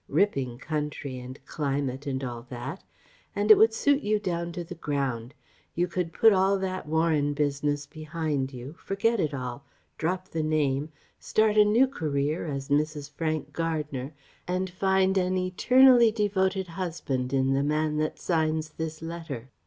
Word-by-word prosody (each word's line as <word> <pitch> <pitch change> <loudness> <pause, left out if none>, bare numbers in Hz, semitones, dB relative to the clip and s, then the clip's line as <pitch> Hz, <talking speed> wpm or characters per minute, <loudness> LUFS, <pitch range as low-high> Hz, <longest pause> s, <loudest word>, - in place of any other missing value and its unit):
Ripping 135 -12 +1
country 145 -2 -4
and 125 +2 -9
climate 140 -2 -2
and 135 -1 -2
all 120 -1 -6
that. 120 -1 -6 0.5
It 210 +1 +7
would 220 +2 +5
suit 285 +5 +2
you 215 -3 +1
down 170 -4 -3
to 175 - -4
the 175 +2 -8
ground. 135 -5 -3 0.4
You 175 +1 +1
could 180 -1 -2
put 225 +5 +5
all 195 +1 +3
that 185 -3 -3
Warren 155 -2 +1
business 145 0 0
behind 155 -3 -3
you, 130 +2 -8
forget 225 +3 0
it 155 -5 +1
all, 125 -1 -5 0.4
drop 185 +3 -1
the 160 - -2
name, 150 -2 0 0.3
start 215 -1 +2
a 210 - +7
new 225 +5 +5
career 155 - -2
as 140 -2 -4
Mrs. 150 0 0
Frank 155 0 -3
Gardner, 150 -5 -3 0.4
and 185 +1 -1
find 190 +1 +2
an 185 0 0
eternally 240 +6 +5
devoted 190 -3 0
husband 165 -8 -3
in 135 0 +2
the 135 - +2
man 150 +1 0
that 155 0 -1
signs 160 -2 0
this 160 +1 -6
letter. 165 -7 -6
155 Hz, 155 wpm, -27 LUFS, 140-185 Hz, 0.5 s, It